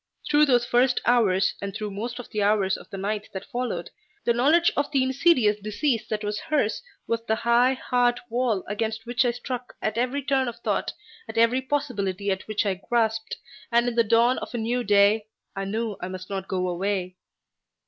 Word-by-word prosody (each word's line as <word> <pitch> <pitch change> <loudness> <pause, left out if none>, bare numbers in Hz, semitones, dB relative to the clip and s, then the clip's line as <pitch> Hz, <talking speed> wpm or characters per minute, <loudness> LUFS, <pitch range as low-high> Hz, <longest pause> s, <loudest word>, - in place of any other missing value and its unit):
Through 300 0 +4
those 245 -2 +3
first 245 +1 +3
hours, 200 -6 +3
and 200 -1 -5
through 210 -1 -4
most 230 +5 -5
of 245 - -7
the 210 - -1
hours 200 -2 +2
of - - -11
the 195 - -7
night 210 +2 -3
that 190 0 -6
followed, 245 0 -4 0.3
the 235 - +3
knowledge 305 +8 +4
of 290 - 0
the 270 -3 +2
insidious 260 -6 +3
disease 215 +4 -1
that 215 -1 -2
was 210 0 -2
hers 295 -9 0 0.2
was 230 0 -2
the 220 - +2
high, 235 +3 +3
hard 245 -1 +1
wall 235 -4 0
against 220 +2 -3
which 240 +2 +1
I - - +3
struck 245 +1 -5
at 215 +1 -1
every 255 +3 -1
turn 265 -1 +1
of 235 - -4
thought, 210 -4 -1 0.4
at 220 - -7
every 230 +3 +4
possibility 205 -9 -2
at 190 0 -3
which 215 0 0
I 190 -2 -1
grasped, 225 -2 0 0.4
and 235 +1 +3
in 245 - 0
the 235 0 +3
dawn 230 +3 +3
of - - -7
a - - -1
new 240 +2 -1
day 205 +1 +4 0.3
I 195 0 -3
knew 215 +1 -2
I 180 - -3
must 185 +1 -8
not 195 -1 -3
go 185 -1 -1
away. 185 0 -2
225 Hz, 200 wpm, -25 LUFS, 205-245 Hz, 0.4 s, Through